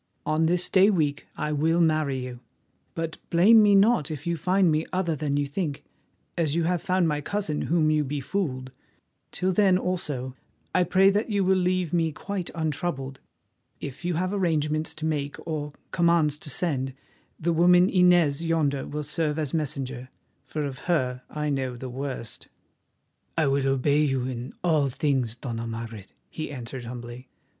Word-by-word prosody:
On 155 +1 +2
this 180 +1 +3
day 195 +1 +5
week 150 -7 0
I 150 - -2
will 160 +3 +2
marry 155 -4 +2
you, 125 -1 -6 0.6
but 165 -1 -3
blame 210 +7 +6
me 205 -1 +5
not 200 - +4
if 150 -2 -6
you 170 0 0
find 180 +2 +2
me 155 +1 +1
other 175 -3 0
than 145 -1 -1
you 145 - +1
think, 145 0 -3 0.5
as 160 -3 0
you 170 - +1
have 175 0 0
found 185 -2 +1
my 150 -1 -1
cousin 165 -2 -2
whom 160 -2 +3
you 155 -1 +2
befooled. 140 -2 -3 0.6
Till 185 +1 0
then, 190 -1 +4
also, 145 -9 -3 0.4
I 180 -1 +3
pray 185 +3 +3
you 195 - +7
that 210 +4 0
you 200 -2 +1
will 190 +1 +3
leave 180 -2 0
me 165 -2 +2
quite 190 +3 -4
untroubled. 150 -4 -3 0.6
If 140 +4 -7
you 175 -1 -1
have 185 +3 -1
arrangements 155 -5 0
to 155 - -5
make 145 -2 -1
or 150 -2 -4 0.2
commands 170 -4 +2
to 150 - -8
send, 135 -4 -2 0.4
the 170 +1 +1
woman 180 +2 +5
Inez 175 -5 +4
yonder 155 -5 0
will 150 +1 -4
serve 150 +1 -1
as 150 -4 -2
messenger, 135 -4 -3 0.4
for 155 - -3
of 135 -3 -5
her 125 -7 +1
I 150 -1 -2
know 130 -3 -2
the 130 +1 -6
worst." 130 -2 -6 0.9
"I 160 - +3
will 135 0 +1
obey 140 +2 +2
you 135 -3 0
in 125 0 -5
all 155 -5 +2
things, 130 -4 0
Dona 115 -2 -5
Margaret," 115 -3 -6 0.2
he 155 - -5
answered 125 -2 -6
humbly. 120 +1 -8
155 Hz, 170 wpm, -26 LUFS, 135-175 Hz, 0.9 s, you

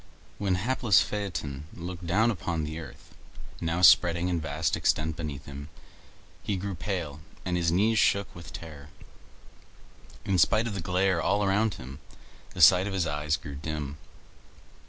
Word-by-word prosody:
When 95 -3 +1
hapless 105 -3 +3
Phaeton 80 -10 -4
looked 85 0 -7
down 110 +7 +3
upon 85 -5 -3
the 80 +2 -5
earth, 75 -6 -12 0.5
now 85 +2 -1
spreading 85 0 +6
in 85 -2 -1
vast 80 -1 -1
extent 80 0 0
beneath 75 -4 -6
him, 70 +1 -8 0.7
he 100 - -2
grew 100 +1 -4
pale 85 -5 -4 0.3
and 90 -1 -1
his 85 -2 +1
knees 105 +5 +3
shook 100 0 +2
with 85 -1 -11
terror. 75 -4 -10 1.4
In 95 -2 +1
spite 110 +7 +4
of 115 - -3
the 95 - -4
glare 90 0 +1
all 105 +5 +1
around 100 0 +1
him, 65 +1 -10 0.6
the - - -2
sight 90 +1 +7
of 100 - -4
his 95 -3 0
eyes 75 0 -1
grew 70 - -9
dim. 75 0 -5
85 Hz, 155 wpm, -28 LUFS, 75-95 Hz, 1.4 s, sight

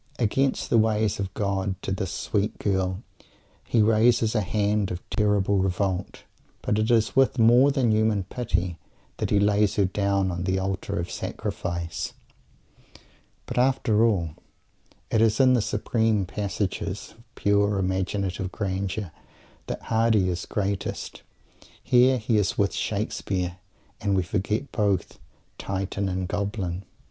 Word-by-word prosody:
Against 135 +3 0
the 115 - +5
ways 110 -2 +1
of 95 -1 -3
God 95 -2 -1
to - - -3
this 95 0 -2
sweet 100 +2 -1
girl 95 0 -1 0.6
he 115 -3 +2
raises 110 +1 +3
a 110 - +2
hand 105 0 0
of 90 0 -6
terrible 100 -2 +2
revolt, 95 0 -1 0.4
but 105 - +1
it 110 +2 +1
is 115 -2 +2
with 135 0 +4
more 120 +4 +6
than 135 -5 +2
human 110 -2 +2
"pity" 90 -5 -2 0.4
that - - -2
he 105 - +3
lays 105 0 +3
her 100 - +3
down 100 0 0
on 90 +1 -3
the 95 0 +1
Altar 95 0 -2
of 85 - -3
Sacrifice. 85 -2 -4 1.3
But, - - -2
after 125 -4 +3
all, 95 -9 +2 0.8
it 110 - +3
is 110 -1 +3
in 130 -1 +6
the 120 - +3
supreme 110 -1 0
passages 100 0 -3
of 115 - -21
pure 100 0 +2
imaginative 95 0 -1
grandeur 95 -2 -3 0.6
that - - -4
Mr. - - -17
Hardy 110 -4 +2
is 90 0 -3
greatest. 100 -1 -3 0.6
Here 130 +1 +5
he 110 -1 +1
is 100 -2 0
"with 100 -1 +1
Shakespeare" 95 -4 -2 0.4
and 100 -2 +1
we 95 - +2
forget 105 +8 -2
both 100 -3 0 0.4
Titan 95 0 -2
and 95 -1 -2
Goblin. 100 -2 -3
100 Hz, 140 wpm, -25 LUFS, 95-110 Hz, 1.3 s, more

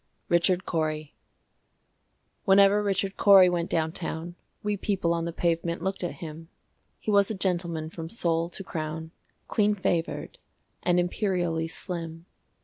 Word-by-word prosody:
Richard 175 +2 +3
Cory 155 -2 -2 1.3
Whenever 200 +1 +6
Richard 195 -1 -1
Cory 195 -3 +8
went 175 -1 -1
down 160 -1 0
town, 165 0 -4 0.3
We 210 0 0
people 190 -4 0
on 165 0 -1
the 170 - -2
pavement 170 0 -1
looked 190 -1 -2
at 175 - -2
him: 160 +1 -8 0.5
He 215 - -3
was 200 -1 +4
a 220 - -2
gentleman 170 -4 -1
from 165 -1 -7
sole 170 -4 0
to 195 - -7
crown, 160 -1 -5 0.4
Clean 210 -1 +2
favored, 180 - -2 0.4
and 180 0 +3
imperially 175 -3 0
slim. 165 -1 -6
175 Hz, 140 wpm, -27 LUFS, 165-195 Hz, 1.3 s, Cory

